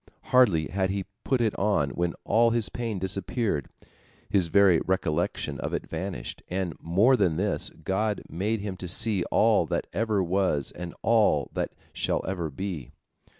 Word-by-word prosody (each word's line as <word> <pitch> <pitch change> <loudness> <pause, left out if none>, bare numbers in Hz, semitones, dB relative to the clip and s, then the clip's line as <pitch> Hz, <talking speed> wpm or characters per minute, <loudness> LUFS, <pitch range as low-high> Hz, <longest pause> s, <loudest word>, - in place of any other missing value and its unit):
Hardly 100 -12 +5
had 95 +1 0
he 95 -1 -2 0.2
put 130 -3 +1
it 110 -3 +1
on 95 -9 +1
when 85 +1 -1
all 115 +1 +4
his 115 -4 +2
pain 115 0 -3
disappeared, 95 - 0 0.6
his 95 -4 +3
very 90 0 +5
recollection 85 -3 -1
of - - -2
it - - -5
vanished, 85 -7 -5
and, 90 -2 -2
more 100 +11 +4
than 90 -9 +1
this, 100 +2 0
God 100 +6 -2
made 100 +6 -2
him 100 -2 -4
to 90 - -6
see 95 +1 0
all - - +3
that - - -1
ever 110 -3 +1
was 90 -6 0
and 90 -1 -7
all 110 -2 +3
that - - -2 0.2
shall - - -1
ever 90 -4 -2
be. 85 -3 -6
95 Hz, 160 wpm, -27 LUFS, 85-105 Hz, 0.6 s, Hardly